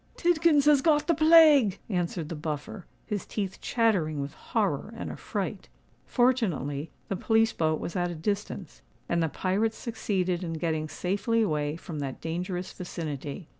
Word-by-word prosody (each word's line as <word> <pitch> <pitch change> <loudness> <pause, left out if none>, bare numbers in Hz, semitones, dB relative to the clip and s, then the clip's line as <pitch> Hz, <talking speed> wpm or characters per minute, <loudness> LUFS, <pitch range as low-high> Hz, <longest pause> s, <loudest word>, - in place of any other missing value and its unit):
"Tidkins 335 -4 +3
has 295 -2 +6
got 295 0 +3
the 340 - +3
plague," 310 - +6
answered 175 -5 -2
the 165 - -4
Buffer, 155 +5 -5 0.2
his 210 -3 -3
teeth 195 -3 -4
chattering 190 -11 +1
with 140 +1 -4
horror - - -1
and - - -5
affright. - - -4 0.4
Fortunately 175 - +1 0.2
the 195 - -2
police 225 +3 +2
boat 155 -1 0
was 170 - -5
at 175 -1 0
a 175 - -5
distance; 200 +1 -4 0.3
and 170 0 +1
the 165 - +1
pirates 205 +8 0
succeeded 190 -6 -1
in 165 -2 -3
getting 160 -1 -2
safely 205 +7 0
away 150 -5 -1
from 165 -2 -7
that 135 -2 -4
dangerous 180 +2 -4
vicinity. 155 -2 -6
180 Hz, 155 wpm, -28 LUFS, 160-225 Hz, 0.4 s, has